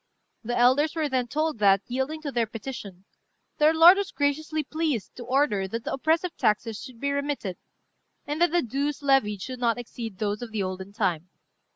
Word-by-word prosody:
The 240 +2 -2
elders 265 +6 +4
were 315 -2 0
then 255 -3 -1
told 305 0 -1
that, 195 -1 +4
yielding 265 +5 -3
to 285 - -3
their 235 -3 0
petition, 210 -5 -8 0.5
their 305 +1 +6
lord 330 +4 +8
was 400 -1 -1
graciously 305 +2 -1
pleased 300 - -2
to 245 - -6
order 240 -6 +1
that 230 +4 -5
the - - -3
oppressive 325 +5 0
taxes 215 +1 0
should 255 -4 -11
be 280 +2 -1
remitted, 280 -10 -2 0.7
and 295 +3 -3
that 345 - +5
the 345 +1 +1
dues 280 +4 -2
levied 210 -8 +2
should 255 -1 -6
not 235 -2 +1
exceed 230 -4 -7
those 205 +1 -2
of 240 - -5
the 215 -2 -1
olden 185 +1 -5
time. 185 -5 -1
255 Hz, 190 wpm, -26 LUFS, 215-295 Hz, 0.7 s, lord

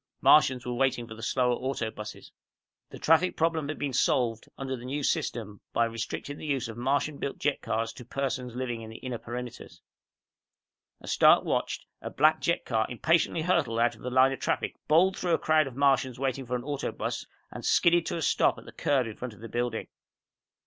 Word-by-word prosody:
Martians 130 -5 +5
were 125 - -2
waiting 125 -1 +1
for 115 - -9
the 110 - -11
slower 125 +1 +1
auto 120 -3 -2
buses. 105 -1 -9 0.6
The - - -9
traffic 165 +3 +3
problem 160 -2 +1
had 155 - -3
been 140 -2 -3
solved, 115 -2 +1
under 135 -1 -3
the 120 - -10
New 140 +3 -3
System, 105 -6 -2
by 115 - +3
restricting 115 +5 -5
the - - -7
use 135 -4 -1
of 115 - -7
the 120 - -7
Martian 140 +3 0
built 140 - -3
jet 145 0 0
cars 115 0 -2
to 125 - -10
persons 125 -1 -3
living 120 -2 -3
in 110 - -8
the 110 - -9
inner 125 -3 -5
perimeters. 120 0 -7 1.2
As - - -4
Stark - - +6
watched, - - -1 0.2
a - - -5
black 155 +2 +3
jet 170 - 0
car 110 -2 0
impatiently 160 +5 +1
hurtled 160 -10 +1
out 120 0 +3
of 110 - -16
the 125 - -4
line 130 +1 +5
of 135 - -4
traffic, - - -1
bowled 180 +5 +4
through 175 -2 +2
a - - 0
crowd 155 -2 +3
of 130 - -8
Martians 135 -2 +2
waiting 135 -1 -2
for 125 - -1
an 120 - -3
auto 145 0 -3
bus, - - -4 0.2
and - - -8
skidded 170 -1 +3
to - - -2
a 165 - -3
stop - - +3
at - - -12
the - - -10
curb 135 -4 +1
in 110 -2 -6
front 125 -3 -6
of - - -18
the 115 - -8
building. 120 -1 -2
130 Hz, 215 wpm, -28 LUFS, 120-145 Hz, 1.2 s, Stark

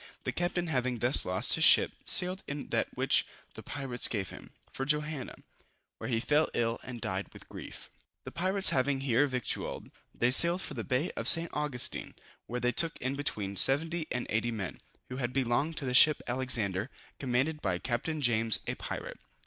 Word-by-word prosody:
The - - -2
captain 175 0 -2
having 130 -6 -2
thus 120 +4 +3
lost 90 +1 +4
his - - +2
ship, - - +7
sailed 185 +1 +3
in 140 0 -6
that - - 0
which - - +2 0.3
the - - -7
pirates 135 -4 +1
gave 100 -5 -4
him, - - -12 0.2
for 135 - -4
Johanna, 150 -1 -2 0.6
where - - -6
he 115 -2 0
fell 150 +6 +1
ill 115 0 -1
and 125 -2 -9
died 95 -1 -4
with - - -15
grief. - - -10 0.4
The - - -9
pirates 190 +3 +4
having 135 +1 0
here 135 +1 +2
victualled, 130 -3 -3 0.2
they 120 +1 0
sailed 170 +7 +6
for - - -6
the 115 -4 -5
Bay 130 +7 -1
of - - -4
St. 165 0 +5
Augustine, 135 -4 -1 0.3
where 125 - -4
they 125 0 0
took 165 +6 -2
in 130 +2 -3
between 105 -9 -1
70 160 - +1
and 125 - -3
80 110 +2 0
men, 105 -7 -5 0.3
who 125 - -6
had 125 -2 -3
belonged 135 +5 -1
to 140 - -4
the 125 - -2
ship 150 +4 +6
Alexander, 120 -5 -2 0.3
commanded 135 +4 -1
by 95 -3 -1
Capt. 120 +5 -3 0.2
James, 115 -4 +2
a - - -3
pirate. - - -7
130 Hz, 185 wpm, -29 LUFS, 120-150 Hz, 0.6 s, ship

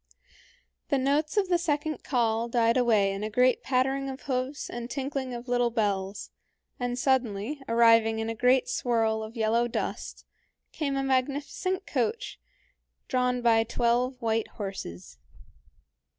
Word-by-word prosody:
The 280 - +2
notes 290 +6 0
of 400 -2 +3
the 350 -1 +2
second 310 -2 -2
call 230 -2 0
died 230 -1 +2
away 220 -6 +3
in 195 +1 -5
a 215 - -2
great 250 +3 +3
pattering 270 +1 0
of 265 +1 -7
hoofs 260 +1 -2
and 240 0 -6
tinkling 270 0 -3
of 240 +1 -7
little 245 -1 +2
bells, 200 -3 -2 0.5
and 245 0 -2
suddenly, 250 0 0
arriving 230 -1 +5
in 225 0 -2
a 225 - -2
great 250 +3 +3
swirl 225 - 0
of 220 +2 -8
yellow 225 +2 +2
dust, 235 - -4 0.5
came 280 -3 -2
a 270 - 0
magnificent 285 +8 -1
coach 460 +3 -2 0.7
drawn 250 -1 0
by 225 -1 +4
twelve 240 +2 0
white 225 -2 0
horses. 90 - -7
245 Hz, 140 wpm, -28 LUFS, 225-270 Hz, 0.7 s, arriving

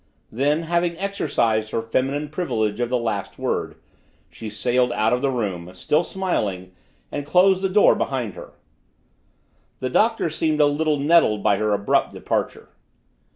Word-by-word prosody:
Then, 145 +7 0
having 170 0 0
exercised 115 - 0
her 115 - -2
feminine 135 +6 -1
privilege 110 - -2
of 120 -1 -1
the 125 - +1
last 115 -4 -3
word, - - -2 0.6
she 110 - -8
sailed 120 +4 +1
out 110 +1 +1
of 125 - 0
the 140 - +1
room, 100 -9 -3
still 150 - +1
smiling, 105 - -3 0.4
and 145 - -3
closed 185 +5 +4
the 190 - 0
door 205 +2 +5
behind 125 -7 -2
her. - - -11 1.3
The 130 - -3
Doctor 225 -4 +2
seemed 155 -1 0
a 150 - +6
little 150 +1 +1
nettled 140 -8 +3
by 100 - +3
her 105 +1 0
abrupt 100 0 +1
departure. - - -3
130 Hz, 155 wpm, -22 LUFS, 110-165 Hz, 1.3 s, a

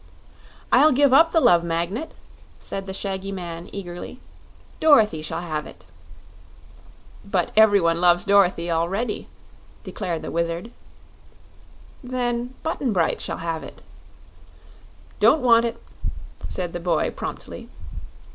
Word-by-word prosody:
"I'll 310 - +6
give 275 0 +4
up 325 +4 +6
the 330 - +4
Love 175 - +5
Magnet," 170 - -3 0.4
said 195 0 -5
the - - -4
shaggy 195 0 -4
man, 175 -2 -7
eagerly; 180 +4 -8 0.6
"Dorothy 220 - +4
shall 155 - -4
have 155 -3 -4
it." - - -15 1.4
"But 195 -3 -1
every 215 -2 +6
one 170 -1 +1
loves 175 0 +4
Dorothy 185 -4 +3
already," 195 +8 -1 0.6
declared 175 -6 -4
the - - -5
Wizard. 170 +6 -2 1.3
"Then 245 0 -2
Button 280 -7 -1
Bright 170 -4 +1
shall - - -4
have 165 -1 -3
it." - - -12 1.4
"Don't 310 - +4
want 230 -1 +5
it," 230 - -4 0.7
said 175 -2 -4
the 175 - -4
boy, 175 0 0
promptly. - - -7
190 Hz, 120 wpm, -23 LUFS, 170-235 Hz, 1.4 s, I'll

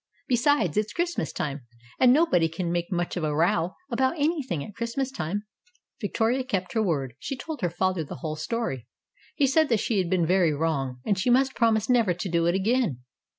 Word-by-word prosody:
Besides, 245 - +2
it's 210 0 0
Christmas 345 - -1
time, 140 -4 -4 0.3
and 250 -1 +6
nobody 255 - +3
can 170 +1 -3
make 175 +2 -2
much 175 -1 -1
of 175 - -3
a 150 -1 0
row 170 +2 +1 0.2
about 260 +7 +1
anything 285 - -1
at 210 - -11
Christmas 235 +4 -3
time." 200 -2 -3 0.6
Victoria 230 +5 0
kept 190 -8 -3
her 225 - +2
word. 140 - -1
She 270 - -4
told 305 +1 -6
her 175 - +1
father 185 0 0
the 145 - -8
whole 155 +4 -4
story. 155 - -3 0.5
He 290 - +3
said 310 +3 +3
that 230 -3 +3
she 215 -1 0
had 180 -2 0
been 180 -2 +2
very 175 -2 +3
wrong, 140 -5 -2
and 200 -3 +1
she 225 - +1
must 265 +2 +3
promise 225 -2 +2
never 230 -8 +3
to 185 +2 -4
do 170 -1 +2
it 175 - +2
again. 200 - +1
195 Hz, 200 wpm, -26 LUFS, 165-245 Hz, 0.6 s, and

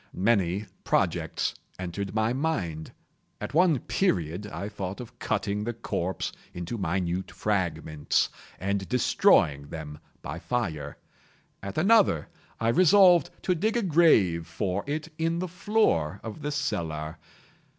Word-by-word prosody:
Many 100 -1 +1 0.2
projects - - 0 0.2
entered 95 +3 -4
my 110 +2 +2
mind. 100 - -2 0.5
At - - -5
one 170 -2 +4
period 90 - 0
I 100 0 -5
thought 95 -2 -5
of 120 -2 -10
cutting 105 0 -1
the 120 +1 -3
corpse 95 -6 -3 0.2
into 90 +6 -4
minute 90 0 -1
fragments, 80 -7 0 0.3
and 100 0 -2
destroying 70 - +3
them 75 -1 -7 0.2
by 80 +3 -5
fire. 80 -12 -3 0.6
At 100 0 -6
another, 195 - +4 0.3
I 115 - +1
resolved 180 - +6
to 185 - +2
dig 215 +7 0
a 235 - 0
grave 110 - +4
for 95 +3 -2
it 155 +2 -3
in 165 +1 +1
the 185 +2 -2
floor 175 - +1
of 110 +6 -7
the 150 - -2
cellar. 80 - -3
100 Hz, 130 wpm, -27 LUFS, -, 0.6 s, resolved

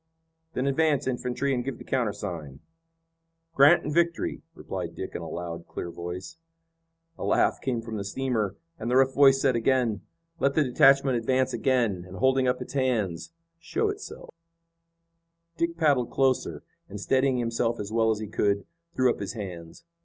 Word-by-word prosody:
"Then 130 - -1
advance 145 0 +2
infantry 125 +2 -1
and 125 -1 -1
give 130 -1 -4
the - - -11
countersign." 100 - -3 0.9
"Grant 140 0 +6
and 150 - -3
Victory," 170 +1 0
replied - - -6
Dick - - -6
in - - -5
a - - -6
loud, 85 -1 -6
clear 85 - -6
voice. 90 - -7 0.8
A - - -4
laugh - - +2
came 120 -4 -2
from 115 -1 -5
the 100 - -3
steamer, 110 -2 -2 0.2
and 115 - -3
the 125 - +1
rough 135 0 +4
voice 135 -1 +6
said 135 -2 +2
again: 115 -4 +1 0.4
"Let 140 -1 +1
the 155 - +4
detachment 135 0 +4
advance 130 +2 +1
again, 120 -9 +1
and 95 - -10
holding 130 0 +3
up 125 0 0
its - - -12
hands, 120 - -1 0.3
show 405 - -1
itself." 410 0 -8 1.2
Dick 170 0 -1
paddled 140 -7 +2
closer 135 -2 0 0.3
and, 105 - -7
steadying 130 +4 +2
himself 115 0 -1
as 105 0 -5
well 110 0 +2
as 110 - +1
he 110 0 -5
could, 100 -1 0 0.3
threw 130 - +3
up - - -5
his 100 - -4
hands. 90 - -8
125 Hz, 170 wpm, -27 LUFS, 105-135 Hz, 1.2 s, Grant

